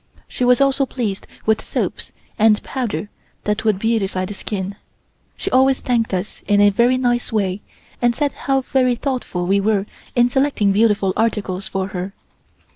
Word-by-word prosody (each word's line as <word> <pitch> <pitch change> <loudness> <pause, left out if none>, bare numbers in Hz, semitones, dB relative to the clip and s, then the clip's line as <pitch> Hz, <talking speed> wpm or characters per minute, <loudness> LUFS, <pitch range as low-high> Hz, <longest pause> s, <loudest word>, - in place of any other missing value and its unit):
She - - -3
was 250 +1 +5
also 275 0 +2
pleased 215 -8 -3 0.2
with 220 0 +2
soaps - - -3 0.3
and 215 -1 +4
powder 230 -5 -3 0.3
that 210 +1 -1
would 215 -3 +2
beautify 195 -4 0
the 205 - -6
skin. 195 -1 -4 0.6
She - - -4
always 265 +1 +4
thanked 235 -2 0
us 185 +2 -3
in 205 -1 +4
a 205 0 +6
very 240 +5 +3
nice 245 -1 0
way 200 -3 0 0.4
and 240 -1 +3
said 290 -2 0
how 270 -1 0
very 255 -1 +1
thoughtful 240 -9 -3
we 195 +2 +3
were 200 -1 +1 0.3
in 240 -1 +5
selecting 255 -5 +2
beautiful 205 -2 +2
articles 200 -4 -1
for 190 0 -3
her. 190 +1 -5
220 Hz, 165 wpm, -20 LUFS, 200-250 Hz, 0.6 s, a